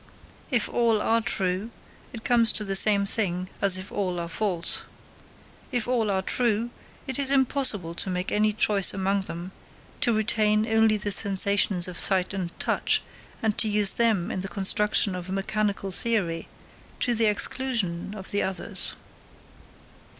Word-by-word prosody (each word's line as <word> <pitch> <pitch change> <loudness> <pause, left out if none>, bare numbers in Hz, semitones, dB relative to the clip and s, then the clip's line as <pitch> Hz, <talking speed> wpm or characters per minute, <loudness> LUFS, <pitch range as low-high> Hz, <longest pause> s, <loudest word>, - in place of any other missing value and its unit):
If 240 -5 0
all 230 -3 +1
are 230 +2 +1
true, 195 0 -2 0.4
it 230 -1 -9
comes 230 -2 +4
to 215 - +2
the 195 -1 -3
same 200 0 +4
thing 185 -3 0
as 195 -2 +4
if 185 +1 -9
all 185 -4 -3
are 170 - -4
false. 175 0 -1 0.9
If 245 -2 -2
all 235 -4 0
are 190 -1 -1
true, 235 +1 -1 0.3
it 265 -1 -3
is 275 -1 +2
impossible 260 - +1
to 180 - -2
make 180 0 -3
any 215 +1 +2
choice 205 -3 +3
among 195 0 -1
them, 175 +1 -7 0.5
to 240 - +1
retain 215 -1 +1
only 220 -1 +3
the 205 0 -4
sensations 200 -2 +2
of 180 -1 -7
sight 190 -1 +1
and 185 -3 -4
touch, - - +1 0.4
and 220 -2 0
to 220 - +2
use 205 -2 +3
them 220 -7 +1
in 185 - -3
the 195 - -5
construction 205 +1 +2
of 180 0 -7
a - - -4
mechanical 200 0 -2
theory, 180 -6 0 0.5
to 245 - +2
the 230 -1 +1
exclusion 210 -4 -1
of 195 -2 -8
the 205 - 0
others. 190 0 +2
205 Hz, 160 wpm, -25 LUFS, 190-220 Hz, 0.9 s, comes